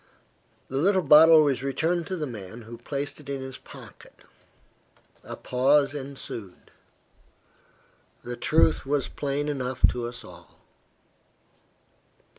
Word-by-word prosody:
The 135 - -4
little 185 +5 +2
bottle 155 +2 +8
was 140 -3 0
returned 160 +5 -1
to 190 - -3
the 155 - -3
man, 115 -2 -9
who 115 +1 -11
placed 140 +4 -5
it 145 -2 -13
in 140 -1 -3
his 130 -1 -8
pocket. - - -14 1.1
A - - -7
pause 140 +3 +2
ensued. 135 -9 -6 1.5
The 120 0 -5
truth 80 -8 +2
was 140 0 -1
plain 145 0 -3
enough 130 -3 +1
to 120 -1 -3
us 120 +1 -6
all. - - -15
140 Hz, 120 wpm, -26 LUFS, 125-150 Hz, 1.5 s, bottle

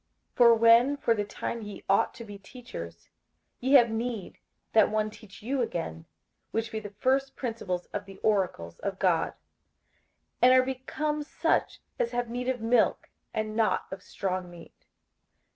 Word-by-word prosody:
58:005:012 - - -37
For 235 -2 +7
when 230 +5 +5
for 235 - +2
the 210 -2 -1
time 225 +3 -5
ye 205 -1 -8
ought 195 - +2
to 230 - -8
be 205 -2 -10
teachers, 85 - -10 0.5
ye 260 +3 0
have 240 -5 +7
need 225 -3 -4 0.3
that 220 -2 +6
one 215 0 0
teach 210 -2 -14
you 260 +3 -1
again 165 - -3 0.4
which 225 +1 -2
be 220 - -3
the 210 -1 -8
first 270 +4 +1
principles 210 -8 -3
of 205 - -3
the 195 -1 -12
oracles 185 - 0
of 195 -1 -3
God; 180 -4 +1 1.1
and 255 +1 +7
are 255 0 +5
become 295 +4 -2
such 295 - 0 0.2
as 235 - 0
have 245 -1 -2
need 250 +1 -2
of 250 -3 -2
milk, 230 0 +2 0.2
and 215 0 -3
not 225 -1 +1
of 190 -1 -6
strong 185 -2 -3
meat. 170 -1 -15
225 Hz, 165 wpm, -28 LUFS, 195-245 Hz, 1.1 s, For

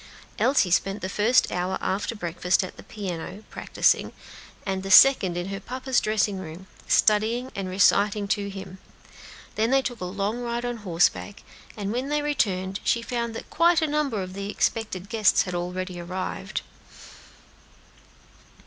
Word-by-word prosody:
Elsie 260 -9 +3
spent 195 +2 +1
the - - -1
first 220 +5 +3
hour 180 +1 -1
after 200 +4 -2
breakfast 180 0 0
at 185 - -7
the - - -11
piano, 190 0 -6
practising, - - +1 0.5
and 190 -1 -2
the 195 - -6
second 190 -5 +7
in 175 +2 -3
her 195 0 -4
papa's 255 +4 -1
dressing 210 -2 0
room, 175 +1 -9 0.2
studying 225 +4 +2
and 195 -3 -4
reciting 200 +2 +3
to 200 -1 -1
him; 190 -1 -9 0.7
then 220 +2 +1
they 270 +1 +3
took 245 -5 -5
a - - -2
long 200 +5 -2
ride 240 0 -3
on 245 -1 -3
horseback, 190 +1 0 0.3
and 205 0 -3
when 255 +3 -2
they 295 0 0
returned 195 -9 0
she 235 - +1
found 235 -1 -3
that - - -8
quite 340 0 +4
a 320 - +1
number 290 -9 -1
of 185 0 -8
the 200 +1 -5
expected 205 -3 -1
guests 220 -2 +3
had 180 - -6
already 180 +1 -4
arrived. 185 +2 -4
200 Hz, 160 wpm, -25 LUFS, 185-235 Hz, 0.7 s, second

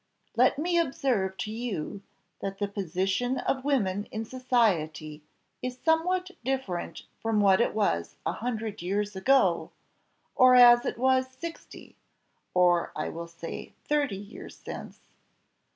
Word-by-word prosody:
Let - - +4
me 340 +3 +1
observe 245 - 0
to 215 - -4
you, 215 -5 -4 0.4
that 195 0 -4
the 205 - -1
position 195 +6 -1
of 265 0 -1
women 205 -8 0
in 220 +1 -5
society 180 - 0 0.4
is 250 0 -4
somewhat 360 +5 +1
different 255 -9 -3 0.2
from 225 -1 0
what 195 0 +5
it 235 - 0
was 85 - 0
a - - +1
hundred 220 -4 -4
years 200 +3 -2
ago, 265 +8 +3 0.7
or 255 0 +7
as 240 -1 +8
it - - -3
was 260 +1 +2
sixty, 330 +6 -10 0.6
or 175 -1 +3
I 155 - -2
will 170 +1 -6
say 165 0 -8
thirty 290 -9 0
years 205 +2 -10
since. - - -9
220 Hz, 135 wpm, -28 LUFS, 190-260 Hz, 0.7 s, as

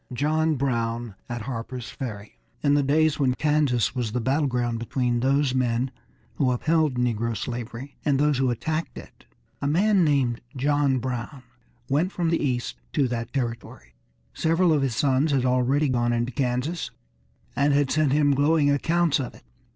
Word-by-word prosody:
XI 125 - -7
JOHN 155 +3 +1
BROWN 120 -4 -2 0.2
AT 120 -2 -4
HARPER'S 120 0 -6
FERRY 105 -5 -7 0.2
In 145 -1 +3
the 145 - +4
days 155 +2 +2
when 130 -3 +2
Kansas 150 -5 +1
was 120 -5 -3
the 125 - 0
battle 135 +5 +1
ground 120 -2 -1
between 120 0 -1
those 135 +1 +2
men 125 0 0 0.5
who 135 -4 +2
upheld 155 +2 +1
negro 115 -2 -1
slavery, 120 +3 -6
and 145 -3 +2
those 145 -1 +2
who 130 -1 +2
attacked 155 +7 -3
it, - - -13 0.4
a 140 - 0
man 190 +5 +3
named 135 -6 +1
John 140 0 +2
Brown 125 +1 -4 0.4
went 155 +7 +1
from 170 -3 -1
the 165 - +1
east 125 - -2 0.2
to 135 - +2
that 115 -1 -4
territory. 115 - -5 0.4
Several 165 +1 +2
of 150 - +2
his 130 -4 -1
sons 140 +3 +2
had 130 -2 +1
already 130 +4 +2
gone 120 -2 +1
into 120 +1 -1
Kansas, 130 +6 -2 0.7
and 140 +1 +2
had 140 -1 +2
sent 155 -3 +2
him 145 0 +3
glowing 145 +1 +3
accounts 165 +2 +2
of 130 -3 -5
it. - - -17
135 Hz, 170 wpm, -25 LUFS, 120-150 Hz, 0.7 s, the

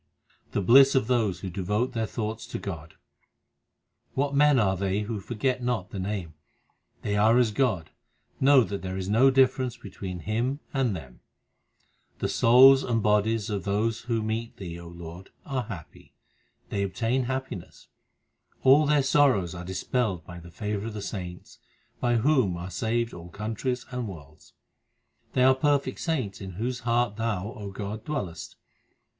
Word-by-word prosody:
The 100 - 0
bliss 135 +6 +7
of 130 - +3
those 110 -7 0
who 95 - -5
devote 105 +8 -1
their 115 -2 -1
thoughts 110 0 -4
to - - -5
Godr 85 -5 -7 1.2
What 140 +1 0
men 145 0 +5
are 95 -5 +3
they 95 +2 -1
who 105 0 -3
forget 125 +5 -2
not 120 -6 -2
the 100 - -5
Name? 95 -4 -3 0.7
They 105 - -1
are 110 +3 +4
as 120 -3 +3
God; 105 -9 0 0.5
know 135 -1 +6
that 100 -1 -4
there 95 0 -4
is 95 -1 -4
no 115 +7 +5
difference 130 -2 +2
be 100 - -11
tween 90 -2 -6
Him 120 - -1
and 130 -7 +1
them. 65 -7 -10 1.0
The - - -2
souls 130 +3 +7
and 115 -3 0
bodies 105 +1 +2
of 100 -3 -2
those 105 +3 0
who 115 -2 -2
meet 110 +1 -3
Thee, 85 -3 -7
O 85 - -10
Lord, 85 +2 -10 0.2
are 130 -3 -2
happy. 85 -9 -10 0.5
They 100 - -1
obtain 115 +6 0
happiness; 130 -8 -5 0.8
all 140 +3 +6
their 150 -1 +3
sorrows 130 - +3
are 90 0 -7
dispelled 95 0 -2
by 85 0 -9
the 85 0 -12
favour 105 +4 -4
of 115 - -6
the 105 - -5
saints, 90 -4 -7 0.4
By 120 -1 +1
whom 115 - +2
are 90 +2 -6
saved 115 +5 -1
all 85 0 -9
countries 115 +6 -3
and 125 -2 -3
worlds. 80 -5 -12 0.8
They 125 - +3
are 130 +1 +7
perfect 140 -1 0
saints 125 - -2
in 95 -1 -7
whose 120 +7 -3
hearts 120 -3 0
Thou, 110 -3 -2
O 105 -6 -7
God, 105 +2 -6
dwellest. 100 - -5
110 Hz, 165 wpm, -27 LUFS, 95-125 Hz, 1.2 s, bliss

